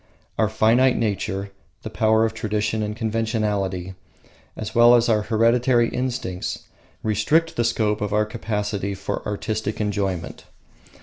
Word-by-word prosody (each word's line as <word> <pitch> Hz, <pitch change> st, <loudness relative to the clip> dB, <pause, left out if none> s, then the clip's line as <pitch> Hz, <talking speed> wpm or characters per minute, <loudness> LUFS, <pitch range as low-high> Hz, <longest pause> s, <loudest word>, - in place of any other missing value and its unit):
Our 110 Hz, -2 st, +3 dB
finite 115 Hz, +4 st, +3 dB
nature, 100 Hz, -2 st, -2 dB, 0.3 s
the -, -, -6 dB
power 110 Hz, 0 st, +3 dB
of 110 Hz, -, -2 dB
tradition 110 Hz, -1 st, -1 dB
and 105 Hz, 0 st, -3 dB
conventionality, 105 Hz, -5 st, -1 dB, 0.6 s
as 110 Hz, 0 st, -5 dB
well 120 Hz, +1 st, +7 dB
as 120 Hz, 0 st, +3 dB
our 110 Hz, -2 st, +3 dB
hereditary 115 Hz, +2 st, +2 dB
instincts, 125 Hz, -8 st, -3 dB, 0.4 s
restrict 150 Hz, +11 st, +1 dB
the 120 Hz, -, +1 dB
scope 110 Hz, -3 st, 0 dB
of 105 Hz, -1 st, -2 dB
our 105 Hz, +1 st, +2 dB
capacity 105 Hz, -3 st, -3 dB
for 95 Hz, 0 st, -4 dB
artistic 110 Hz, +1 st, -3 dB
enjoyment. 100 Hz, -4 st, -3 dB
110 Hz, 130 wpm, -23 LUFS, 105-115 Hz, 0.6 s, well